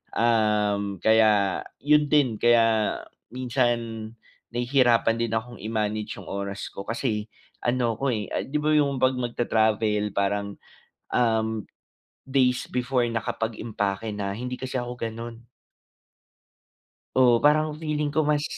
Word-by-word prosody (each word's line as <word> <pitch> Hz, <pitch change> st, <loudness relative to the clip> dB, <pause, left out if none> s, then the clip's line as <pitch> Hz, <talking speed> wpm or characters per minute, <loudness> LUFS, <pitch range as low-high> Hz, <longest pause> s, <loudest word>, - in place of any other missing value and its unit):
um, 105 Hz, -4 st, +1 dB
kaya 110 Hz, -3 st, +4 dB, 0.2 s
yun 150 Hz, 0 st, +4 dB
din. 140 Hz, -7 st, +3 dB
Kaya 115 Hz, -2 st, +3 dB, 0.3 s
minsan, 120 Hz, -3 st, -1 dB, 0.5 s
nahihirapan 120 Hz, -2 st, +3 dB
din 115 Hz, -2 st, -1 dB
akong 120 Hz, +2 st, -4 dB
i-manage 110 Hz, 0 st, -2 dB
'yung -, -, -12 dB
oras 100 Hz, 0 st, -4 dB
ko 100 Hz, -, -7 dB
kasi 115 Hz, -3 st, -2 dB, 0.3 s
ano 120 Hz, -2 st, 0 dB
ako 140 Hz, -, 0 dB
eh, 105 Hz, -, -5 dB
ah -, -, -1 dB
'di 135 Hz, -, -9 dB
ba 155 Hz, -, +1 dB
'yung 140 Hz, -3 st, +2 dB
'pag 130 Hz, 0 st, +4 dB
magta-travel, 110 Hz, -3 st, 0 dB
parang, 100 Hz, 0 st, -1 dB, 0.6 s
um 110 Hz, -2 st, +1 dB, 0.6 s
days 130 Hz, -2 st, +2 dB
before 125 Hz, 0 st, 0 dB
nakapag-impake 110 Hz, -2 st, -3 dB
na, 100 Hz, -1 st, -3 dB
hindi 125 Hz, +3 st, -4 dB
kasi 130 Hz, 0 st, -3 dB
ako 125 Hz, 0 st, -4 dB
ganon. 115 Hz, 0 st, -6 dB, 1.7 s
Oo, 125 Hz, -2 st, +5 dB
parang 155 Hz, +2 st, +3 dB
feeling 150 Hz, -2 st, -2 dB
ko 155 Hz, 0 st, +1 dB
mas 150 Hz, -1 st, +2 dB
115 Hz, 125 wpm, -25 LUFS, 110-130 Hz, 1.7 s, Oo